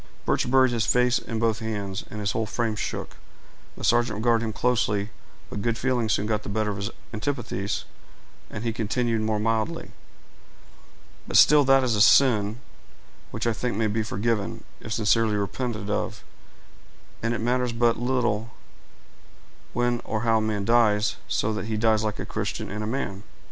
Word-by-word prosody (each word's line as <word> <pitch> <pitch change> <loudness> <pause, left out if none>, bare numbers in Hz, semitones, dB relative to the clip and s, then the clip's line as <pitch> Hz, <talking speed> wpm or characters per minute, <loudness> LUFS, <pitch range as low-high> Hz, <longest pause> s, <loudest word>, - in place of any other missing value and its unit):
Birch - - +1
buried 130 -1 +5
his 115 -2 0
face 125 0 +3
in 115 - -5
both 115 0 +1
his 110 - -5
hands, 100 -3 -3
and 105 - -7
his 100 -1 -1
whole 110 +1 -1
frame 115 0 -1
shook; - - -5 0.6
the - - -8
sergeant 120 -2 +2
regarded 115 +1 +2
him 110 - -2
closely, 110 -3 0 0.4
but 100 - -4
good 115 +1 0
feelings 120 -4 +1
soon 105 - 0
got 105 -1 0
the - - -8
better 105 +1 0
of 100 - -5
his 100 +2 -3 0.2
antipathies, 110 -4 -3 0.6
and 105 - -6
he 115 -1 -1
continued 115 +1 0
more 110 -1 0
mildly,— 110 0 -1 1.4
"But - - +2
still 150 0 +7
that 135 0 +5
is 120 -3 +1
a 105 - +2
sin 110 -3 +5 0.7
which - - -4
I 115 - +2
think 120 -1 -3
may 110 - +1
be 110 +1 0
forgiven, 110 0 -2 0.2
if 110 - -9
sincerely 110 0 +2
repented 105 +1 -3
of; - - -2 1.0
and 115 +1 0
it - - -3
matters 125 +1 0
but 115 0 +2
little 120 -3 0 1.2
when 120 0 0
or 110 -1 -2
how 115 -1 +3
a - - -1
man 105 -2 -1
dies, 110 -2 +3
so 110 - 0
that 105 - -3
he 110 0 -2
dies 110 0 +3
like 105 -1 -2
a - - -4
Christian - - -4
and 105 +1 -4
a - - -3
man. 110 -6 -3
110 Hz, 180 wpm, -25 LUFS, 105-120 Hz, 1.4 s, still